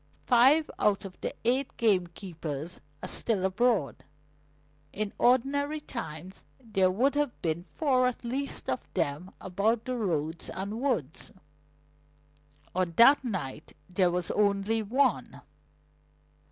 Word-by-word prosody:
Five 270 Hz, +6 st, +5 dB
out 205 Hz, -1 st, +2 dB
of 185 Hz, -2 st, -10 dB
the -, -, -3 dB
eight 255 Hz, +3 st, +1 dB
gamekeepers 175 Hz, -6 st, -2 dB, 0.2 s
are -, -, -3 dB
still 205 Hz, -5 st, +1 dB
abroad. 195 Hz, -, +1 dB, 0.9 s
In 210 Hz, 0 st, -3 dB
ordinary 285 Hz, +5 st, +2 dB
times 185 Hz, -, -8 dB, 0.2 s
there 210 Hz, -7 st, +1 dB
would 245 Hz, +10 st, +2 dB
have 290 Hz, -3 st, -1 dB
been 170 Hz, +1 st, -1 dB
four 255 Hz, -2 st, +2 dB
at 250 Hz, -, -4 dB
least 270 Hz, +4 st, -3 dB
of 130 Hz, -, 0 dB, 0.2 s
them 145 Hz, +6 st, -1 dB
about 210 Hz, +5 st, 0 dB
the 255 Hz, -, -2 dB
roads 165 Hz, -7 st, -2 dB
and 200 Hz, +5 st, -5 dB
woods. 205 Hz, -, -2 dB, 1.4 s
On 180 Hz, -2 st, 0 dB
that 270 Hz, +5 st, +7 dB
night 165 Hz, -, -5 dB
there 180 Hz, -1 st, +2 dB
was 175 Hz, -1 st, -2 dB
only 205 Hz, +2 st, +1 dB
one." 250 Hz, +2 st, 0 dB
205 Hz, 120 wpm, -29 LUFS, 180-250 Hz, 1.4 s, that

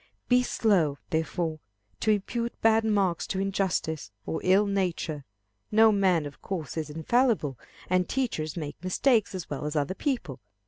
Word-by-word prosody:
Be 250 Hz, 0 st, +5 dB
slow, 185 Hz, -, +2 dB
therefore, 160 Hz, 0 st, -1 dB, 0.4 s
to -, -, 0 dB
impute 230 Hz, +3 st, -1 dB
bad 225 Hz, 0 st, +5 dB
marks 200 Hz, -5 st, +1 dB
to 190 Hz, -, -2 dB
injustice, 190 Hz, -, -1 dB, 0.2 s
or -, -, -3 dB
ill 190 Hz, +3 st, +4 dB
nature. 175 Hz, -7 st, -2 dB, 0.5 s
No 220 Hz, +1 st, +6 dB
man 185 Hz, -6 st, +2 dB
of 145 Hz, -, -9 dB
course 165 Hz, -9 st, -4 dB
is 155 Hz, -2 st, -3 dB
infallible, 160 Hz, -, +1 dB, 0.3 s
and 185 Hz, 0 st, +1 dB
teachers 170 Hz, -, -2 dB
make 150 Hz, +1 st, -6 dB
mistakes 215 Hz, +3 st, +2 dB
as 185 Hz, -, -5 dB
well 145 Hz, -, -3 dB
as 150 Hz, +1 st, -3 dB
other 145 Hz, +3 st, 0 dB
people. 190 Hz, -, -3 dB
185 Hz, 150 wpm, -27 LUFS, 155-215 Hz, 0.5 s, No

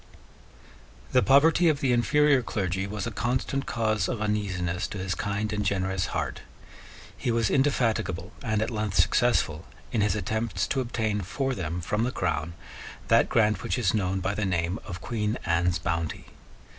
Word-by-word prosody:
The 125 Hz, -, +5 dB
poverty 160 Hz, -, +5 dB
of 150 Hz, -3 st, +1 dB
the 135 Hz, -3 st, +1 dB
inferior 140 Hz, +4 st, +4 dB
clergy 95 Hz, -4 st, -2 dB
was 105 Hz, +1 st, -4 dB
a 120 Hz, -, -3 dB
constant 130 Hz, +5 st, -1 dB
cause 110 Hz, -5 st, 0 dB
of 120 Hz, -, -2 dB
uneasiness 100 Hz, -4 st, -1 dB
to -, -, -7 dB
his 95 Hz, 0 st, -2 dB
kind 100 Hz, +3 st, -2 dB
and 105 Hz, -1 st, -1 dB
generous 95 Hz, -2 st, 0 dB
heart. -, -, -3 dB, 0.7 s
He -, -, -3 dB
was 115 Hz, -2 st, +1 dB
indefatigable 115 Hz, -10 st, +1 dB
and 110 Hz, -4 st, 0 dB
at -, -, -3 dB
length 105 Hz, -3 st, -2 dB
successful 90 Hz, -4 st, +2 dB, 0.2 s
in 115 Hz, -, +1 dB
his 105 Hz, -1 st, +2 dB
attempts 105 Hz, -1 st, -1 dB
to 135 Hz, -, +1 dB
obtain 110 Hz, -4 st, -1 dB
for 135 Hz, +8 st, -2 dB
them 90 Hz, -4 st, -3 dB
from 105 Hz, +6 st, -1 dB
the 125 Hz, -, 0 dB
Crown 85 Hz, -, -2 dB, 0.6 s
that -, -, +5 dB
grant 105 Hz, -2 st, +2 dB
which -, -, -1 dB
is 115 Hz, -7 st, +1 dB
known 95 Hz, -3 st, 0 dB
by 95 Hz, +2 st, -1 dB
the 105 Hz, -, -2 dB
name 90 Hz, 0 st, 0 dB
of 90 Hz, -4 st, -7 dB
Queen 110 Hz, 0 st, -2 dB
Anne's 85 Hz, +1 st, +2 dB
Bounty. 85 Hz, -2 st, -3 dB
105 Hz, 170 wpm, -27 LUFS, 95-120 Hz, 0.7 s, The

